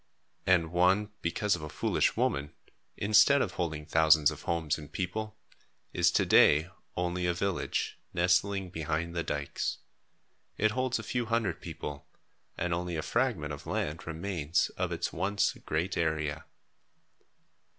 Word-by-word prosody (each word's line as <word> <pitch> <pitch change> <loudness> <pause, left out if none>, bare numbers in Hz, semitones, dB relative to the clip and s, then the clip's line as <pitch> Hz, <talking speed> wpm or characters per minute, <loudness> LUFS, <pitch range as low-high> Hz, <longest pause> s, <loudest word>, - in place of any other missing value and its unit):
And 85 -3 +3
one, 95 +4 +3
because 100 +4 +1
of 85 - -8
a 75 - -6
foolish - - 0
woman, 70 +1 0 0.4
instead 110 +7 +5
of - - 0
holding 80 -4 -3
thousands 80 -1 +5
of 75 -1 -9
homes 80 -3 -1
and 75 - -11
people, 105 +4 -4 0.6
is - - +4
to - - +3
day 75 +5 +5 0.3
only 90 0 -1
a 85 - +1
village 95 0 -2
nestling 90 +2 +1
behind 80 +1 -2
the 85 - 0
dykes. 75 -3 -3 0.8
It 110 0 +3
holds 130 +2 0
a 110 - -6
few 120 +2 -2
hundred 110 -7 0
people 75 -4 -7 0.5
and 90 -1 -1
only 90 0 -2
a 80 - -2
fragment - - 0
of - - -9
land 75 +3 -3
remains 85 -1 -1
of - - -3
its - - -2
once 100 +2 +1
great 80 +5 -1
area. 80 -2 -1
85 Hz, 145 wpm, -30 LUFS, 80-100 Hz, 0.8 s, instead